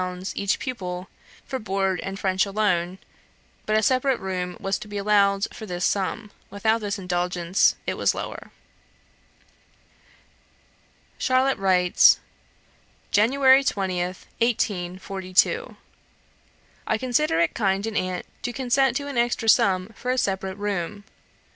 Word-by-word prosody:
each 200 -1 0
pupil, 185 -7 -5 0.4
for 265 - -4
board 195 -3 -1
and 195 +1 -5
French 190 -1 +1
alone, 190 -3 0 0.7
but 215 0 +2
a 220 - +1
separate 260 +1 +2
room 180 -2 -4
was 195 0 -2
to - - -9
be 205 0 -6
allowed 200 -1 +3
for 220 - -9
this 175 -1 -2
sum; 205 +2 -1 0.2
without 220 +3 0
this 205 -1 -2
indulgence, 180 0 +1
it - - -1
was - - +1
lower. - - -6 2.7
Charlotte 260 0 +2
writes: 180 -2 +5 0.9
"January 265 +5 +5
20th, 185 -5 -2
1842. 195 - 0 1.1
"I 220 - +1
consider 255 - +1
it 170 -1 +2
kind 195 -2 0
in 225 -1 -4
aunt 185 -2 -2 0.2
to 245 - -3
consent 260 0 +1
to 285 - -5
an 275 -4 -2
extra 240 -1 0
sum 185 -3 +4
for 250 - -5
a 255 - +1
separate 190 -4 -1
room. 205 0 -3
200 Hz, 125 wpm, -24 LUFS, 185-235 Hz, 2.7 s, writes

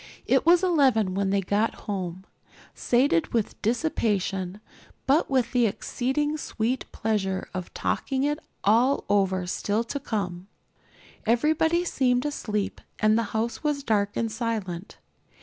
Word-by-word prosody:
It - - +2
was 350 +1 +6
eleven 265 - +3
when 195 0 0
they 200 0 +2
got 205 +4 0
home, 185 -2 -4 0.5
sated 240 - +2
with 225 -3 -1
dissipation, 205 - -1 0.5
but 285 +5 +3
with 260 -4 +1
the 245 -2 +3
exceeding 270 +8 -1
sweet 245 0 -2
pleasure 195 -4 -1
of 185 -2 -5
talking 265 0 -1
it 295 +1 0 0.2
all 240 +7 +3
over 190 -2 +2
still 205 +4 -1
to 285 +5 -4
come. 195 -8 -3 0.8
Everybody 315 +8 +2
seemed 250 -5 +1
asleep 210 -8 -2 0.2
and 215 0 +3
the 230 - +3 0.2
house 230 +4 -2
was 295 -2 0
dark 205 -4 0
and 225 -1 -1
silent. 215 -6 -4
225 Hz, 130 wpm, -26 LUFS, 200-270 Hz, 0.8 s, was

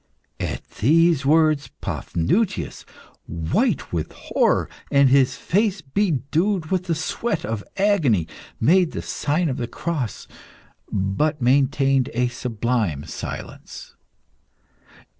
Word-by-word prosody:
At - - -4
these 155 - +3
words 155 -3 +3
Paphnutius, 85 - -1 0.4
white 80 +1 -1
with 80 -2 -2
horror - - +1 0.2
and 140 -1 +5
his 130 -1 +4
face 200 0 0
bedewed 165 - 0
with 185 -1 0
the 170 -2 0
sweat 160 +4 -2
of 110 -2 -3
agony 160 - +2 0.3
made 175 +6 +3
the - - -4
sign 160 +4 -1
of 130 - -2
the 120 - -3
cross, 140 -2 -4 0.6
but 105 +11 0
maintained 135 +1 +2
a 125 +1 +1
sublime 115 - -2
silence. - - -8
140 Hz, 105 wpm, -22 LUFS, 120-170 Hz, 0.6 s, and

